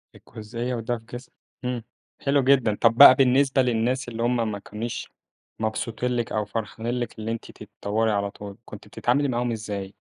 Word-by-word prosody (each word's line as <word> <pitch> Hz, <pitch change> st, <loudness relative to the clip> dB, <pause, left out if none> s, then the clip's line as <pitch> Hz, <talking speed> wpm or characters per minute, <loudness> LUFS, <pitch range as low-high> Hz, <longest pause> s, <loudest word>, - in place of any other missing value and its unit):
الجزئية 115 Hz, +3 st, -6 dB
وده 120 Hz, +1 st, -2 dB
في 115 Hz, -, -17 dB
قسم 120 Hz, +2 st, -10 dB, 0.3 s
إمم 125 Hz, -2 st, -2 dB, 0.4 s
حلو 140 Hz, 0 st, +2 dB
جدًا، 130 Hz, -5 st, +3 dB
طب 115 Hz, 0 st, +5 dB
بقى 135 Hz, 0 st, +10 dB
بالنسبة 135 Hz, +1 st, +3 dB
للناس 125 Hz, +1 st, 0 dB
اللي 115 Hz, 0 st, -4 dB
هُم 120 Hz, -2 st, +1 dB
ما 100 Hz, -, -5 dB
كانوش 110 Hz, +3 st, -6 dB, 0.5 s
مبسوطين 115 Hz, +2 st, -2 dB
لِك 120 Hz, -1 st, -2 dB
أو 105 Hz, -1 st, -1 dB
فرحانين 110 Hz, +2 st, -4 dB
لِك 120 Hz, -1 st, -5 dB
إن 110 Hz, -, -6 dB
أنتِ 115 Hz, 0 st, -5 dB
تتطوري 110 Hz, +2 st, -2 dB
على 100 Hz, -1 st, -1 dB
طول، 100 Hz, -1 st, -10 dB
كنتِ 105 Hz, 0 st, -11 dB
بتتعاملي 125 Hz, +7 st, 0 dB
معاهم 120 Hz, -1 st, -1 dB
إزاي؟ 105 Hz, -3 st, -5 dB
115 Hz, 170 wpm, -25 LUFS, 110-125 Hz, 0.5 s, بقى